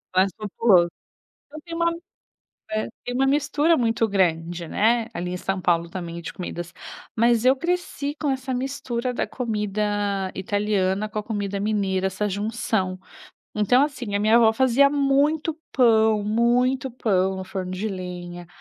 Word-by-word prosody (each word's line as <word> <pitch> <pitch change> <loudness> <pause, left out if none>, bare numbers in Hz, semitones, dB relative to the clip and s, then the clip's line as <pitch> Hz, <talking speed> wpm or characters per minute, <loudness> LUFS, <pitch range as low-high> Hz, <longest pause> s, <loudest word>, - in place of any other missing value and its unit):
Mais 185 +1 +5
populoso. 200 -4 +3 0.6
Então 310 +2 -10
tem 335 -1 -7
uma 335 0 +2 0.8
é. 215 0 -1 0.2
Tem 245 - -4
uma 270 +1 +2
mistura 295 +3 +2
muito 230 -1 +1
grande, 175 -3 0
né, 225 +6 +2
ali 180 +1 -4
em - - -2
São 190 +1 -2
Paulo, 170 -1 +1
também, 170 -2 -6
de - - -6
comidas. 175 -1 -6 0.4
Mas 235 0 +3
eu 260 +1 +6
cresci 335 -2 -2
com 295 - 0
essa 265 -1 -2
mistura 255 -1 -3
da - - -1
comida 205 -4 -2
italiana 205 0 0
com 215 0 -5
a - - -1
comida 205 -2 -3
mineira, 195 -2 0
essa 190 +2 -1
junção. 205 -2 -1 0.6
Então, 215 +6 +4
assim, 245 -8 -3
a - - +2
minha 215 +3 +5
avó 225 -2 +5
fazia 260 +3 +4
muito 290 +3 +1 0.2
pão, 220 -4 +4
muito 245 +4 +2
pão 190 -5 +1
no 190 - -5
forno 185 -1 -5
de 195 +4 -3
lenha, 175 -2 -7
215 Hz, 155 wpm, -24 LUFS, 190-255 Hz, 0.8 s, eu